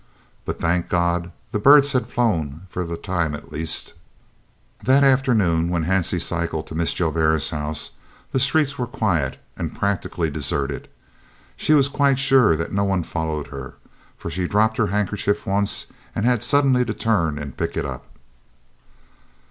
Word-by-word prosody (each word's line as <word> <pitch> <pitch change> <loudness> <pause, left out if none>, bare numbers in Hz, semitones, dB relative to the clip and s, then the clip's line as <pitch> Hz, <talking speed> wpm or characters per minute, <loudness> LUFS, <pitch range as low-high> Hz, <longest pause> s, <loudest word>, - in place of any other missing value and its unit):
But, - - -4
thank 85 +1 0
God! 85 0 0 0.2
the 105 - -1
birds 140 +4 +6
had 125 - 0
flown 85 - -1
for 90 - -3
the 85 0 -5
time 85 -6 -2
at 75 - -12
least. 80 +1 -2 0.9
That 135 +2 +4
afternoon, 110 -12 +3
when 85 -2 -1
Hansie 90 -1 +1
cycled 85 -2 -1
to - - -8
Mrs. 85 0 0
Joubert's 80 -2 +1
house, 75 0 -3 0.4
the 130 - +1
streets 140 +1 +2
were 125 - -1
quiet 90 - -1 0.2
and - - -5
practically 90 -5 -1
deserted. 70 -1 -2 0.7
She 155 - +1
was 140 -2 +5
quite 140 -1 +2
sure 135 -9 +4
that 80 +1 -4
no 100 +1 +1
one 95 -3 0
followed 80 -3 -3
her, 70 -2 -8 0.4
for 85 - -6
she 90 +1 -2
dropped 110 +3 +2
her 105 - +2
handkerchief 105 +1 -1
once 100 +1 +1 0.3
and 105 - -1
had 120 -3 +2
suddenly 130 0 +4
to 110 - -3
turn 85 -10 0
and 70 -2 -7
pick - - -3
it - - -1
up. - - -7
90 Hz, 160 wpm, -22 LUFS, 80-120 Hz, 0.9 s, birds